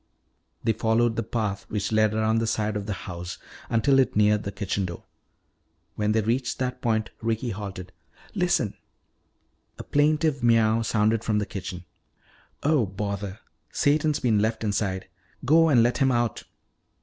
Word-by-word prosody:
They 115 - +2
followed 115 +1 +1
the 115 - 0
path 105 -3 -3
which 105 0 -2
led 110 -1 +3
around 110 +1 +2
the 115 - -1
side 110 -1 -1
of 100 -1 -4
the 105 - -1
house 90 0 -6 0.3
until 135 +4 +3
it 130 - +2
neared 105 0 +4
the 100 - -5
kitchen 100 0 -2
door. 85 -1 -7 0.9
When 105 0 0
they 110 +1 +2
reached 120 +4 -1
that 125 -1 -3
point 110 -2 0
Ricky 115 +1 -1
halted. 95 -3 -7 0.4
"Listen!" 175 - +1 1.0
A - - -7
plaintive 150 -1 +2
miaow 115 -1 +3
sounded 110 0 +1
from 105 -2 0
the 105 - 0
kitchen. 90 -4 -7 0.8
"Oh, 145 -7 +3
bother! 100 +1 -4 0.3
Satan's 150 +1 +2
been 115 -4 +2
left 110 +1 0
inside. 100 -3 -1 0.4
Go 165 +4 +5
and 120 -6 +5
let 120 +4 +1
him 135 -2 +3
out." 120 -2 -1
110 Hz, 155 wpm, -25 LUFS, 105-120 Hz, 1.0 s, Go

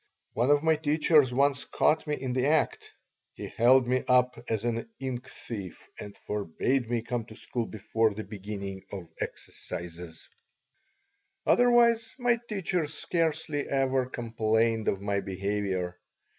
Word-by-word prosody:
One 120 +4 +1
of 145 +1 +4
my 160 -1 +4
teachers 150 -2 +3
once 140 +2 +2
caught 160 0 +1
me 150 - 0
in 130 -2 -3
the 130 +1 +1
act. 155 +1 +1 0.5
He - - -6
held 125 +2 +4
me 130 +1 +1
up 125 0 +4 0.2
as 110 0 -1
an 115 - -2
ink 130 -1 -4
thief 100 -6 -8
and 100 -1 -8
forbade 105 +6 -1
me 120 -2 0
come 115 -1 -3
to 110 - -12
school 120 0 -3
before 110 +1 0
the 105 +2 -6
beginning 100 -2 -6
of 90 -5 -7
exercises 85 -1 -7 1.2
Otherwise 235 -2 +4
my 245 -2 +2
teachers 180 -6 -1
scarcely 160 -3 -1
ever 135 -2 +1
complained 115 -2 0
of 95 - 0
my 100 0 0
behavior. 95 -2 -2
120 Hz, 140 wpm, -28 LUFS, 105-145 Hz, 1.2 s, of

